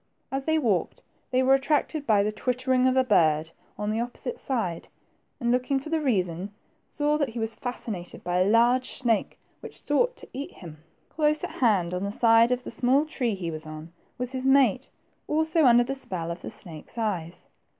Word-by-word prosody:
As 270 Hz, 0 st, -3 dB
they 315 Hz, 0 st, +2 dB
walked, 225 Hz, -, 0 dB, 0.3 s
they 255 Hz, 0 st, +2 dB
were 265 Hz, +1 st, +5 dB
attracted 290 Hz, +2 st, 0 dB
by 210 Hz, -3 st, +4 dB
the 210 Hz, -, 0 dB
twittering 255 Hz, +3 st, +1 dB
of 260 Hz, 0 st, +2 dB
a 260 Hz, -, +5 dB
bird 160 Hz, -8 st, +2 dB, 0.3 s
on 210 Hz, 0 st, -2 dB
the 220 Hz, -, -1 dB
opposite 245 Hz, +1 st, -5 dB
side, 215 Hz, -11 st, -2 dB, 0.5 s
and, 240 Hz, -3 st, 0 dB
looking 255 Hz, +2 st, +1 dB
for 305 Hz, +4 st, -9 dB
the 320 Hz, -1 st, +1 dB
reason, 190 Hz, -, -1 dB, 0.4 s
saw 300 Hz, 0 st, 0 dB
that 285 Hz, -4 st, +1 dB
he 225 Hz, -, -9 dB
was 225 Hz, 0 st, -1 dB
fascinated 220 Hz, -8 st, -6 dB
by 175 Hz, +1 st, 0 dB
a 185 Hz, +2 st, +3 dB
large 240 Hz, +3 st, +3 dB
snake 230 Hz, -4 st, 0 dB, 0.2 s
which -, -, -10 dB
sought 485 Hz, +13 st, +1 dB
to -, -, -10 dB
eat 275 Hz, +3 st, -6 dB
him. 160 Hz, -4 st, -11 dB, 0.3 s
Close 305 Hz, -1 st, +1 dB
at -, -, -3 dB
hand, 190 Hz, -8 st, +2 dB
on 180 Hz, -, -2 dB
the 200 Hz, -, -2 dB
other 200 Hz, -, -5 dB
side 230 Hz, 0 st, +5 dB
of 250 Hz, 0 st, -1 dB
the -, -, -7 dB
small 260 Hz, +5 st, +2 dB
tree 250 Hz, -8 st, -2 dB
he 175 Hz, -3 st, -4 dB
was 155 Hz, 0 st, -7 dB
on, 155 Hz, +2 st, -9 dB, 0.2 s
was 250 Hz, 0 st, -4 dB
his 260 Hz, 0 st, -2 dB
mate, 265 Hz, -2 st, +3 dB, 0.4 s
also 315 Hz, 0 st, +2 dB
under 240 Hz, -1 st, +6 dB
the 255 Hz, -, -3 dB
spell 180 Hz, -11 st, -4 dB
of 170 Hz, +1 st, -7 dB
a -, -, -5 dB
snake's 165 Hz, +4 st, -9 dB
eyes. 185 Hz, -7 st, -3 dB
240 Hz, 200 wpm, -26 LUFS, 190-270 Hz, 0.5 s, under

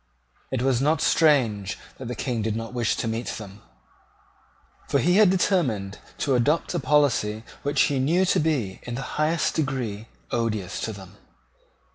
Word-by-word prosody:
It 130 Hz, -2 st, -1 dB
was 130 Hz, -2 st, +2 dB
not 155 Hz, +3 st, +2 dB
strange 115 Hz, -, +2 dB, 0.2 s
that 130 Hz, -, -6 dB
the 125 Hz, -, -4 dB
King 120 Hz, -4 st, -2 dB
did 110 Hz, 0 st, -1 dB
not 115 Hz, +1 st, -5 dB
wish 120 Hz, -2 st, 0 dB
to -, -, -3 dB
meet 115 Hz, +1 st, -3 dB
them: 105 Hz, -1 st, -7 dB, 1.3 s
for -, -, +2 dB
he 180 Hz, +3 st, +3 dB
had 210 Hz, -3 st, +7 dB
determined 135 Hz, -, 0 dB, 0.2 s
to 140 Hz, -, 0 dB
adopt 145 Hz, +9 st, +1 dB
a 175 Hz, -, 0 dB
policy 120 Hz, -9 st, +2 dB, 0.2 s
which 145 Hz, 0 st, +1 dB
he 140 Hz, -2 st, +1 dB
knew 170 Hz, +8 st, +2 dB
to -, -, +2 dB
be, 135 Hz, -12 st, -1 dB
in 120 Hz, -, -6 dB
the 135 Hz, -, -4 dB, 0.2 s
highest 155 Hz, 0 st, +1 dB
degree, 125 Hz, -8 st, -2 dB, 0.2 s
odious 110 Hz, -5 st, -2 dB
to 110 Hz, -, -2 dB
them. 100 Hz, 0 st, -12 dB
125 Hz, 165 wpm, -25 LUFS, 110-150 Hz, 1.3 s, had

